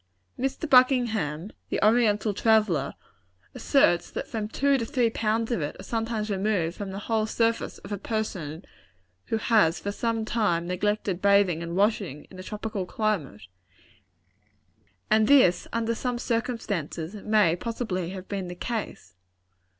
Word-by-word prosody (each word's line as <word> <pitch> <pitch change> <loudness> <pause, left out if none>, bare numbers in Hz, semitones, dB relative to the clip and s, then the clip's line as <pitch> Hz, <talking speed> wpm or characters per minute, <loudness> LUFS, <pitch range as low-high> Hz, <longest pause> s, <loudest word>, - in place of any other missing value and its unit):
Mr. 270 +5 -2
Buckingham, 225 - +3 0.2
the - - -1
Oriental 215 -2 +3
traveller, 210 -10 +2 0.6
asserts 175 -11 +2
that - - -5
from 215 -2 -3
two 275 +4 +2
to - - -1
three 240 -2 +1
pounds 225 +1 0
of 230 - 0
it 145 - -4
are - - -8
sometimes 225 -2 -2
removed 190 -4 0
from 200 -1 -5
the 190 - -6
whole 220 -1 +1
surface 230 +1 0
of 195 - -12
a 205 - -3
person 190 -7 -4 0.6
who 225 - 0
has 210 -7 +3
for 200 - -3
some 225 +1 -1
time 205 -7 0
neglected 190 +1 -1
bathing 200 -4 +4
and 170 0 -5
washing, 195 -7 0
in 185 - -11
a - - -5
tropical 210 -1 -4
climate; 175 - -2 1.7
and 215 0 +4
this, 205 -11 +5
under 230 0 0
some 245 +1 -2
circumstances, 215 - -3
may 210 -4 +2
possibly 185 -4 -3
have 190 0 -8
been 195 -3 -4
the 180 - -7
case. 205 - -5
210 Hz, 145 wpm, -26 LUFS, 180-230 Hz, 1.7 s, this